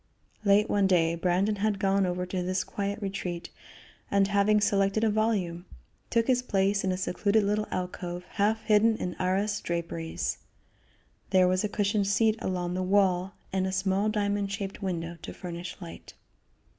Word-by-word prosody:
Late 205 +1 +4
one 200 -1 +2
day 170 -3 +3
Brandon 180 +5 +1
had 210 0 0
gone 195 -1 +2
over 180 0 -2
to 180 0 -3
this 185 +1 -1
quiet 200 +1 -3
retreat, 185 -3 -4 0.6
and 200 -1 +3
having 205 +1 +3
selected 200 +1 +2
a 220 - +3
volume, 200 -6 0 0.4
took 230 -1 +2
his 250 -1 +2
place 200 -4 +1
in 190 - +1
a 185 - -1
secluded 200 +3 +1
little 210 +1 0
alcove 180 -1 -4
half 220 +2 +1
hidden 220 +1 +4
in 180 - -3
arras 195 +3 0
draperies. 165 -1 -3 0.9
There 185 -1 +5
was 185 +2 +1
a 210 - 0
cushioned 205 -1 0
seat 215 +2 +3
along 180 -1 -2
the 185 - -1
wall 190 0 +2 0.2
and 190 0 +1
a - - -2
small 190 +2 +1
diamond 205 -1 -1
shaped 200 0 -5
window 170 -3 -3
to - - -7
furnish 175 0 -7
light. 170 -3 -10
195 Hz, 165 wpm, -28 LUFS, 180-205 Hz, 0.9 s, There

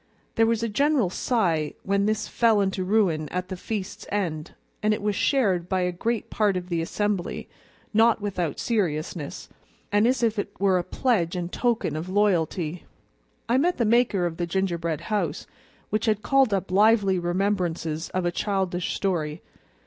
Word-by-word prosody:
There 225 0 +3
was 230 0 +1
a - - +1
general 270 -3 +2
sigh 175 -11 0
when 200 +1 +1
this 215 0 0
fell 225 -3 +3
into 190 -1 0
ruin 180 -7 +1
at 180 0 -4
the 190 - -3
feast's 200 +1 -5
end, 170 -6 -2 0.3
and 215 0 +2
it - - -7
was 210 -1 0
shared 190 -12 +1
by 190 -1 +1
a 180 0 0
great 225 +5 -2
part 205 -3 +2
of 180 0 -6
the 170 -2 0
assembly, 205 +2 -2 0.5
not 225 +1 +4
without 180 -7 -2
seriousness, 165 -8 -2 0.4
and 205 +2 +4
as 250 -1 +1
if 225 -2 +1
it - - -5
were 190 -2 +3
a - - -2
pledge 190 -7 0
and 175 0 -3
token 235 -11 0
of 160 +4 -4
loyalty. 180 -4 0 0.6
I 240 +3 +3
met 350 +5 +1
the 235 - +1
maker 220 -5 +3
of 165 -1 -3
the 175 - -2
gingerbread 170 -4 -1
house, 175 -4 -2 0.5
which 215 +2 0
had 215 -1 +1
called 270 -4 +3
up 195 -1 -1
lively 200 -1 +4
remembrances 175 -3 -1
of 185 -1 -2
a 175 - +1
childish 185 -2 -1
story. 165 -5 -2
195 Hz, 170 wpm, -25 LUFS, 175-215 Hz, 0.6 s, not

